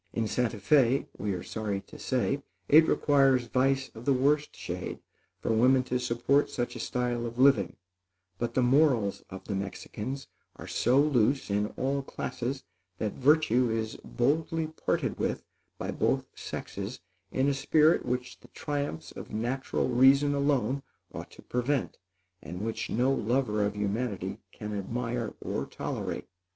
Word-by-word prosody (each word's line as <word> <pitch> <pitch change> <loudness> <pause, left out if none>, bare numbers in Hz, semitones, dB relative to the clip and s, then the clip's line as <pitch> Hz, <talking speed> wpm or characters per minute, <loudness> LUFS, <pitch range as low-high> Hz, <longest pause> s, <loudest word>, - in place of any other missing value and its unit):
In 115 - 0
Santa 120 0 0
Fé, 130 +4 +3
we 100 0 -1
are 90 - -5
sorry 105 -3 -3
to - - -14
say, 130 +2 0 0.3
it 160 +2 +7
requires 135 -3 +4
vice 135 +2 +1
of 115 +2 -10
the 140 - +4
worst 145 +3 +2
shade - - -5 0.4
for - - -1
women 130 +3 +4
to 125 0 -1
support 125 +4 +2
such 120 - -3
a - - -6
style 125 -1 -1
of 115 +1 -8
living; 135 +2 +4 0.6
but 120 0 -2
the 130 - +3
morals 125 -6 +3
of 95 0 -8
the 105 - -4
Mexicans 105 +6 -5 0.3
are - - -10
so 130 +3 +2
loose 135 -4 +2
in 105 +1 +1
all 140 +2 0
classes, 135 0 -4 0.3
that 105 -1 -2
virtue 130 -4 +3
is 110 -1 -2
boldly 160 +5 0
parted 160 0 -2
with - - -1 0.3
by - - -3
both - - +1
sexes - - -6 0.3
in 130 +1 +1
a 140 - +3
spirit 150 +3 +4
which 125 0 -3
the - - -17
triumphs 140 - -4
of - - -9
natural 120 +5 -1
reason 135 +3 +5
alone 140 -1 +1 0.3
ought - - -7
to - - -15
prevent, 125 +2 -1 0.4
and 90 +3 -7
which 110 +1 -3
no 125 +4 +2
lover 115 -3 +1
of 100 0 -1
humanity 105 +1 -2
can 105 0 -6
admire 115 +3 -3
or - - -2
tolerate. - - -4
125 Hz, 155 wpm, -29 LUFS, 110-140 Hz, 0.6 s, it